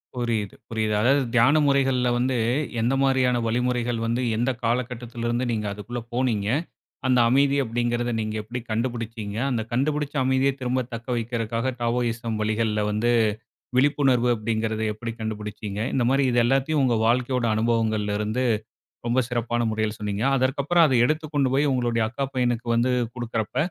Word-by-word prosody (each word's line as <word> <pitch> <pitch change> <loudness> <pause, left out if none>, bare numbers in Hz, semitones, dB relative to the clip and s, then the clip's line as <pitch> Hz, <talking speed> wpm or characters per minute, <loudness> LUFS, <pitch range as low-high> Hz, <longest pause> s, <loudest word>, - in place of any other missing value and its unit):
புரியுது 115 -5 -2
புரியுது. 110 -1 -1
அதாவது 135 +5 +4
தியான 120 +5 +5
முறைகள்ல 135 -2 +2
வந்து, 125 +1 0 0.4
எந்த 120 +4 +1
மாரியான 130 -2 +2
வழிமுறைகள் 120 0 0
வந்து, 115 +2 0 0.2
எந்த 120 +3 +1
காலகட்டத்துலருந்து 120 0 -2
நீங்க 105 -2 -2
அதுக்குள்ள 120 +4 -6
போனீங்க? 115 -5 0 0.6
அந்த 125 -1 +4
அமைதி 140 +2 +3
அப்படிங்கிறத 120 0 -1
நீங்க 110 0 -3
எப்படி 120 +4 -5
கண்டுபுடிச்சீங்க? 115 -2 -3
அந்த 120 -3 0
கண்டுபிடிச்ச 145 +4 -1
அமைதிய 130 +1 +2
திரும்ப 125 +1 0
தக்க 115 +1 -7
வைக்கறதுக்காக 115 +1 -2
டாவோயிசம் 115 -1 -1
வழிகள்ல 110 0 0
வந்து, 110 +3 +1 0.7
விழிப்புணர்வு 135 -3 +3
அப்படிங்கிறத 110 0 -2
எப்படி 115 +2 -5
கண்டுபுடிச்சீங்க? 105 -2 -5
இந்த 130 - +2
மாரி 135 +1 +3
இது 120 - +3
எல்லாத்தையும் 135 +4 +2
உங்க 125 -3 +2
வாழ்க்கையோட 125 +1 +1
அனுபவங்கள்ல 110 -2 0
இருந்து 110 +4 -1 0.6
ரொம்ப 120 +2 +2
சிறப்பான 120 -1 -1
முறையில் 110 0 -2
சொன்னீங்க. 105 0 -2
அதற்கப்புறம் 140 +6 +3
அத 140 - +2
எடுத்துக்கொண்டு 150 -2 0
போய் 145 +2 +3
உங்களுடைய 120 -3 +1
அக்கா 135 +4 -2
பையனுக்கு 120 -2 0
வந்து 120 +2 +2 0.2
குடுக்கறப்ப, 115 -3 -3
120 Hz, 140 wpm, -24 LUFS, 110-130 Hz, 0.7 s, தியான